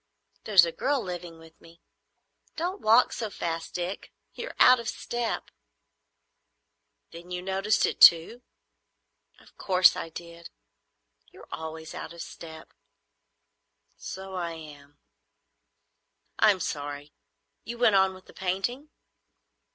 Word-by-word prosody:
"There's 195 -5 +6
a 170 - -3
girl 280 - 0
living 175 -5 -7
with 165 0 -18
me. 165 +1 -18 0.8
Don't 360 +4 -3
walk 230 +3 +4
so 220 - -4
fast, 165 -3 -5
Dick; 180 +2 -5 0.2
you're - - -7
out 255 -1 +7
of 235 0 -4
step." 240 -1 -4 1.6
"Then 170 +1 -12
you 180 0 -4
noticed 195 +2 +1
it - - -4
too?" 170 +9 +7 1.0
"Of - - -21
course 185 -1 +5
I - - -5
did. 170 +1 -10 0.8
You're - - -15
always 160 0 -7
out 165 - -7
of 170 - -7
step." 160 -1 -11 1.2
"So 190 0 -8
I 170 -2 -3
am. 145 -3 -13 1.4
I'm 210 -3 +5
sorry. 145 -2 -5 0.5
You 235 +1 -7
went 235 -3 +4
on 190 -1 +3
with 185 - -16
the - - -17
painting?" 195 +10 -3
180 Hz, 120 wpm, -27 LUFS, 165-215 Hz, 1.6 s, out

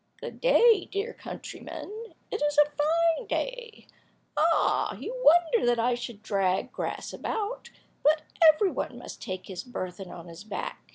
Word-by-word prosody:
"Good - - -8
day, 470 -5 +5
dear 410 +4 -2
countryman, 445 +3 -8 0.2
it - - -3
is 295 0 +1
a 295 0 +5
fine 330 +7 +1
day. - - -4 0.5
Ah! - - +2
you 470 - -6
wonder 330 - +5
that 240 0 +3
I 240 +2 +2
should 240 -3 -6
drag 195 -3 0
grass - - -4
about, 440 +2 -4 0.3
but 305 +1 +3 0.3
every 370 +5 0
one - - -4
must - - -9
take 185 -4 -5
his 185 -3 -6
burthen 190 -6 -6
on 170 -1 -9
his 165 +3 -10
back." 215 -1 -5
295 Hz, 155 wpm, -28 LUFS, -, 0.5 s, day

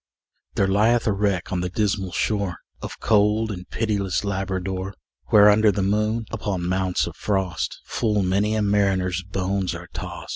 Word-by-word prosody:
There 95 - +2
lieth 110 +5 +3
a 110 - +2
wreck 100 -2 -1
on 90 -1 -1
the 90 - -2
dismal 95 -1 -1
shore 100 -2 -1 0.2
Of - - -7
cold 105 +1 +2
and 90 -2 -8
pitiless 105 -5 -1
Labrador; 95 -1 -3 0.3
Where, 105 -1 +7
under 105 +1 +5
the 100 0 -1
moon, 105 +3 0
upon 100 -6 -3
mounts 95 0 0
of - - -7
frost, 95 -4 -2
Full 105 -4 0
many 100 +4 +1
a 110 - +1
mariner's 95 -3 +1
bones 95 -1 -2
are 85 +1 -9
tost. - - -7
100 Hz, 160 wpm, -23 LUFS, 95-105 Hz, 0.3 s, Where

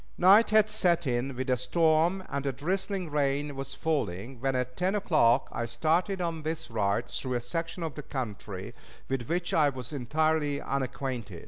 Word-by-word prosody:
Night 200 +5 +6
had 215 -1 +5
set 180 -6 +2
in 125 +1 -1
with 130 +2 -3
a 130 - +3
storm, 160 +7 +2
and 140 0 -3
a - - +2
drizzling 185 - -2
rain 145 0 0
was 135 0 -5
falling 125 - -2
when, 135 0 0
at 125 0 -2
ten 185 +3 0
o'clock, 140 - +3
I 115 - -3
started 165 - +1
on 165 -2 -2
this 160 -2 -4
ride 105 +1 +1
through 130 +1 -3
a - - +1
section 165 +8 -4
of 160 -3 -3 0.2
country 120 -7 -5 0.3
with 130 -3 -3
which 175 +2 -1
I 155 -5 +4
was 130 +1 -7
entirely 150 +2 +1
unacquainted. 130 -8 -3
145 Hz, 175 wpm, -29 LUFS, 125-170 Hz, 0.3 s, Night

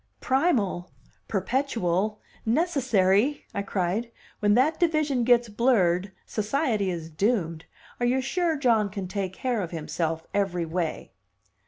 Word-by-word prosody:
"Primal, 250 - +1 0.4
perpetual, 215 -3 0 0.2
necessary!" 245 - +2
I 200 - -1
cried. 200 +4 -2 0.3
"When 205 0 +3
that 270 +6 +3
division 310 -7 +2
gets 240 0 +4
blurred, 200 -5 +2
society 215 -2 0
is 165 -2 -5
doomed. 165 -3 0 0.3
Are 245 - +2
you 255 +2 +2
sure 325 +4 0
John 230 -7 +2
can 195 -1 -5
take 190 -1 -3
care 245 0 -1
of 175 - -4
himself 165 0 -3
every 185 -4 0
way?" 165 0 -3
210 Hz, 125 wpm, -26 LUFS, 185-255 Hz, 0.4 s, gets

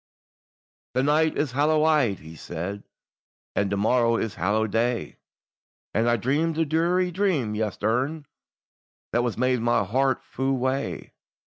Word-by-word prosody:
"This 130 - +2
night 155 +2 +2
is 145 -3 0
hallow 155 +3 +2 0.2
eve," 105 -7 0
he 80 +1 -12
said, 90 +5 -5 0.7
"And 100 -1 +1
to 100 - -1
morrow 115 +2 +3
is 110 -2 -2
hallow 105 +5 +1
day; 115 +3 -1 0.8
And 115 +1 +2
I 120 - +4
dreamed 150 +8 0
a 165 - +2
drearie 175 +4 +1
dream 165 - 0
yestreen, 115 - -1 0.9
That 120 - +2
has 120 -2 -2
made 125 +1 +2
my 120 -2 +2
heart 130 +6 0
fu' 135 +1 -2
wae. 130 +1 -2
125 Hz, 140 wpm, -25 LUFS, 110-150 Hz, 0.9 s, I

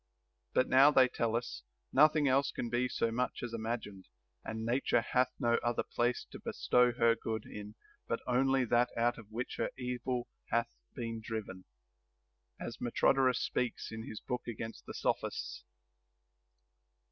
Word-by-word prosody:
But 130 - +3
now 135 +2 +7
they 130 -3 +6
tell 115 -2 -1
us, 115 - -3 0.3
nothing 150 +1 +5
else 135 +1 +3
can 120 - -4
be 125 +1 +1
so 115 - 0
much 125 +2 -2
as 120 -1 -4
imagined, 110 -4 -4 0.4
and 110 0 -4
nature 120 0 +2
hath 125 +2 +1
no 120 0 +2
other 120 0 +1
place 120 +1 0
to - - -8
bestow 125 0 +2
her 115 -1 +4
good 110 -2 -4
in 105 +1 -8 0.3
but 115 - -1
only 130 +1 +3
that 120 +1 +3
out 120 +1 +2
of 105 -2 -13
which 120 +3 -4
her - - 0
evil 125 -1 -2 0.2
hath 115 0 +1 0.2
been 115 -3 -4
driven; 105 -5 -5 0.9
as 115 - -6
Metrodorus 130 +1 +3
speaks 125 -2 -2
in 110 0 -5
his 110 - -6
book 125 -1 -4
against 115 0 -6
the - - -7
Sophists. - - -2
120 Hz, 155 wpm, -33 LUFS, 115-125 Hz, 0.9 s, now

